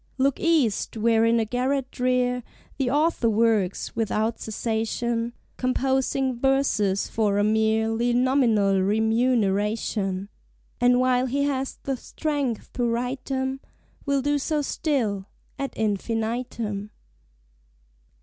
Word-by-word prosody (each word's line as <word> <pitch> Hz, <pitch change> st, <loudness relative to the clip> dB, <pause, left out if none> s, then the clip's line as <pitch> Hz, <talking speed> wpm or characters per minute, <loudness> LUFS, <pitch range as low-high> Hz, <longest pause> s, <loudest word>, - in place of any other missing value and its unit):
Look 275 Hz, 0 st, +1 dB
East, 290 Hz, -, +1 dB
where 225 Hz, 0 st, +3 dB
in 230 Hz, 0 st, +3 dB
a 225 Hz, -, +1 dB
garret 255 Hz, +3 st, -1 dB
drear, 250 Hz, -1 st, +1 dB, 0.4 s
The 265 Hz, -2 st, +1 dB
Author 295 Hz, -3 st, +2 dB
works, 215 Hz, -4 st, +1 dB
without 225 Hz, 0 st, 0 dB
cessation, 230 Hz, +2 st, -2 dB, 0.2 s
Composing 265 Hz, +1 st, 0 dB
verses 245 Hz, -8 st, +1 dB
for 210 Hz, -3 st, 0 dB
a 205 Hz, -, +3 dB
mere 220 Hz, +1 st, +2 dB
ly 235 Hz, +2 st, 0 dB
nominal 240 Hz, -6 st, +3 dB
remuneration; 210 Hz, -2 st, +1 dB, 0.5 s
And, 245 Hz, 0 st, +4 dB
while 255 Hz, 0 st, +2 dB
he 280 Hz, +3 st, 0 dB
has 270 Hz, -2 st, -2 dB
the 270 Hz, -1 st, -2 dB
strength 285 Hz, -5 st, -3 dB
to 245 Hz, -2 st, 0 dB
write 245 Hz, +3 st, -2 dB
'em, 265 Hz, 0 st, -1 dB, 0.4 s
Will 280 Hz, -2 st, 0 dB
do 290 Hz, 0 st, +1 dB
so 300 Hz, +1 st, -1 dB
still 225 Hz, -11 st, -1 dB, 0.3 s
ad 275 Hz, 0 st, -2 dB
infinitum. 220 Hz, 0 st, -2 dB
240 Hz, 115 wpm, -25 LUFS, 220-265 Hz, 0.5 s, And